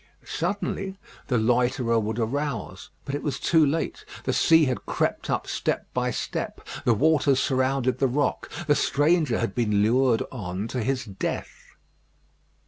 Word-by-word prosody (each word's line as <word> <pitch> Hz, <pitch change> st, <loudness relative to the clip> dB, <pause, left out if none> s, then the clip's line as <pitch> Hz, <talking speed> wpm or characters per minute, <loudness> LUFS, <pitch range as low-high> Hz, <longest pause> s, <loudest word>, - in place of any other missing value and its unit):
Suddenly 195 Hz, +1 st, -3 dB, 0.3 s
the 125 Hz, -, +1 dB
loiterer 120 Hz, 0 st, +2 dB
would 110 Hz, +1 st, -2 dB
arouse; 125 Hz, -1 st, -3 dB, 0.2 s
but 140 Hz, -, -4 dB
it 145 Hz, -, -2 dB
was 140 Hz, -3 st, -2 dB
too 165 Hz, -2 st, +4 dB
late. 150 Hz, +3 st, -1 dB, 0.2 s
The -, -, 0 dB
sea 160 Hz, -1 st, +5 dB
had 130 Hz, -2 st, -3 dB
crept -, -, -1 dB
up -, -, 0 dB
step -, -, -2 dB
by 125 Hz, 0 st, 0 dB
step; 120 Hz, -, -4 dB, 0.2 s
the 120 Hz, -, +4 dB
waters 145 Hz, 0 st, +3 dB
surrounded 130 Hz, -1 st, +1 dB
the 135 Hz, -, +3 dB
rock; 140 Hz, +3 st, -1 dB, 0.2 s
the 150 Hz, -, +4 dB
stranger 145 Hz, -2 st, +2 dB
had 115 Hz, -, -1 dB
been 105 Hz, -4 st, +2 dB
lured 120 Hz, +1 st, +3 dB
on 100 Hz, -3 st, -4 dB
to 125 Hz, -, -2 dB
his 130 Hz, +2 st, -1 dB
death. 100 Hz, -3 st, -5 dB
130 Hz, 150 wpm, -25 LUFS, 115-145 Hz, 0.3 s, sea